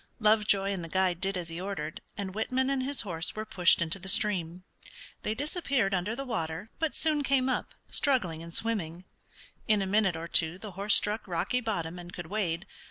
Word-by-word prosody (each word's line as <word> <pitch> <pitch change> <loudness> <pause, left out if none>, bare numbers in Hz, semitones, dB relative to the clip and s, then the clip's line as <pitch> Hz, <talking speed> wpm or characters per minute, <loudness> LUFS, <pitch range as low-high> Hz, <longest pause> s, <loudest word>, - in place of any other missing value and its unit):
Lovejoy 210 -2 +3
and 190 -3 -3
the 165 - -7
guide 185 0 +1
did 195 0 0
as 170 -2 -5
he 165 +2 -6
ordered, 170 -6 -4 0.2
and 195 -2 -4
Whitman 255 +5 0
and 270 -1 0
his 275 +2 0
horse 175 -5 -1
were 215 0 -4
pushed 180 -5 +4
into 170 +4 -2
the 190 +1 -2
stream. 185 -4 +3 0.6
They 215 - -2
disappeared 280 - 0
under 190 +5 -1
the 275 +2 -5
water, 185 -3 -4
but 320 -2 -1
soon 310 -2 +2
came 265 -1 +3
up, 260 - -2 0.2
struggling 195 - +1
and 170 0 -9
swimming. 180 -5 -2 0.6
In 215 -1 +4
a 195 - 0
minute 195 -2 +2
or 165 +1 -5
two 165 +1 +3
the 205 +1 -8
horse 200 +3 +3
struck 210 +1 +2
rocky 185 +8 0
bottom 180 -7 -3
and 175 0 -9
could 175 -1 -7
wade. 175 -2 -2
195 Hz, 200 wpm, -29 LUFS, 175-225 Hz, 0.6 s, pushed